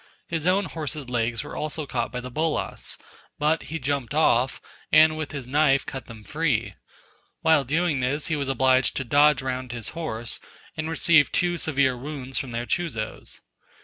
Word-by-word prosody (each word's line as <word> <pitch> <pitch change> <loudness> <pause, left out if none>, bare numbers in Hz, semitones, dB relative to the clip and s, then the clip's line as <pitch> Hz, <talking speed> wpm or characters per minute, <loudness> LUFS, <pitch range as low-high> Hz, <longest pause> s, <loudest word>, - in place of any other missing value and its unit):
His 165 -1 -2
own 190 +2 +3
horse's 150 -5 -5
legs 115 0 0
were 145 - -8
also 155 0 -3
caught 120 -4 -2
by 125 -1 -4
the 125 +1 -8
bolas, 155 +3 -1 0.4
but 155 +2 +2
he 165 - -2
jumped 140 -2 -2
off, 130 -5 +3 0.3
and 155 0 +7
with 155 -2 -4
his 140 -5 -6
knife 140 0 +3
cut 130 -3 -7
them 110 -2 -11
free: 150 -5 0 0.7
while 160 -3 +4
doing 155 +2 +1
this 135 +4 0
he 160 - 0
was 140 -2 -2
obliged 130 0 +3
to 130 - -1
dodge 145 +3 +4
round 130 -1 -3
his 120 -3 -3
horse, 120 -9 -4 0.4
and 155 +1 -3
received 165 -2 +4
two 175 -1 +1
severe 140 -5 +1
wounds 135 0 -4
from 135 - -5
their 120 0 -3
chuzos. 120 -9 -3
140 Hz, 175 wpm, -25 LUFS, 125-155 Hz, 0.7 s, and